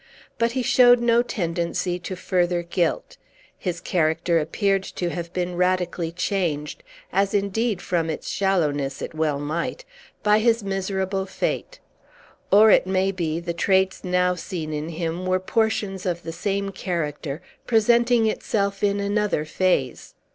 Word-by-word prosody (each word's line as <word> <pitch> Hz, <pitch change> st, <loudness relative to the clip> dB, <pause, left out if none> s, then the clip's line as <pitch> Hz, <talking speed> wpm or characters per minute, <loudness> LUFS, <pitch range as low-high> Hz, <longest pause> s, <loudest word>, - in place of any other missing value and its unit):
But 230 Hz, 0 st, +1 dB
he 255 Hz, -1 st, -1 dB
showed 245 Hz, 0 st, +6 dB
no 235 Hz, 0 st, +4 dB
tendency 175 Hz, -4 st, -2 dB
to 175 Hz, +2 st, -5 dB
further 175 Hz, -1 st, 0 dB
guilt. 170 Hz, -, -1 dB, 0.4 s
His 175 Hz, -2 st, -4 dB
character 165 Hz, 0 st, +1 dB
appeared 195 Hz, +5 st, +1 dB
to 180 Hz, -2 st, -4 dB
have 170 Hz, -1 st, -5 dB
been 180 Hz, 0 st, -2 dB
radically 180 Hz, -2 st, 0 dB
changed 170 Hz, -4 st, -2 dB, 0.3 s
(as, 200 Hz, +1 st, +2 dB
indeed, 205 Hz, +1 st, 0 dB
from 165 Hz, -2 st, 0 dB
its 160 Hz, -, -4 dB
shallowness, 150 Hz, -8 st, 0 dB
it -, -, -6 dB
well 155 Hz, -2 st, 0 dB
might) 165 Hz, -, -3 dB, 0.4 s
by 210 Hz, 0 st, +4 dB
his 230 Hz, 0 st, +2 dB
miserable 195 Hz, 0 st, -2 dB
fate; -, -, -3 dB, 0.7 s
or, 215 Hz, +2 st, +7 dB
it -, -, +4 dB
may 190 Hz, +1 st, +1 dB
be, 165 Hz, -4 st, -2 dB
the 170 Hz, 0 st, -4 dB
traits 190 Hz, +2 st, +1 dB
now 180 Hz, 0 st, +2 dB
seen 165 Hz, -3 st, -5 dB
in 150 Hz, +2 st, -3 dB
him 170 Hz, +2 st, -3 dB
were 185 Hz, 0 st, +2 dB
portions 200 Hz, -1 st, -1 dB
of 175 Hz, -1 st, -2 dB
the 165 Hz, 0 st, -5 dB
same 200 Hz, +2 st, -2 dB
character, 155 Hz, -6 st, -3 dB, 0.3 s
presenting 235 Hz, +1 st, +4 dB
itself 200 Hz, -2 st, -1 dB
in 200 Hz, 0 st, +2 dB
another 200 Hz, -5 st, 0 dB
phase. 155 Hz, -6 st, -1 dB
185 Hz, 145 wpm, -23 LUFS, 170-200 Hz, 0.7 s, or